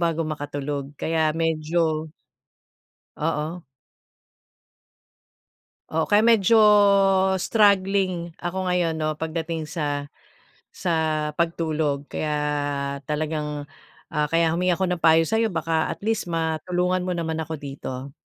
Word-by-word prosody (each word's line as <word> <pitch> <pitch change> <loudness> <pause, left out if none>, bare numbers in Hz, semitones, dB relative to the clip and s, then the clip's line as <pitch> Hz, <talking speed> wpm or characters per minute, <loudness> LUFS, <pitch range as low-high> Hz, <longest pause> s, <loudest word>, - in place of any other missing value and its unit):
bago 165 -1 0
makatulog, 145 -2 -4
kaya 160 -1 +1
medyo 160 0 0 1.1
Oo. 160 +2 -2 2.3
Oo, 160 0 +1
kaya 205 - +6
medyo 225 0 +4 0.9
struggling 190 -5 +2
ako 175 +2 -3
ngayon 175 -2 +1
'no, 155 0 -1
pagdating 160 0 -4
sa 145 -3 -3 0.6
sa 175 - -4 0.5
pagtulog, 155 -4 0
kaya 155 - -2 0.8
talagang, 150 -1 -2 0.5
ah, 150 -1 0
kaya 165 0 +2
humingi 180 +1 +1
ako 190 - 0
ng 175 - -3
payo 165 0 +5
sa'yo 225 +5 +1
baka 165 -3 -1
at - - -6
least 220 -5 -1
matulungan 175 +3 0
mo 185 - -1
naman 160 -1 -2
ako 160 0 -4
dito. 135 -1 -7
160 Hz, 110 wpm, -24 LUFS, 155-175 Hz, 2.3 s, kaya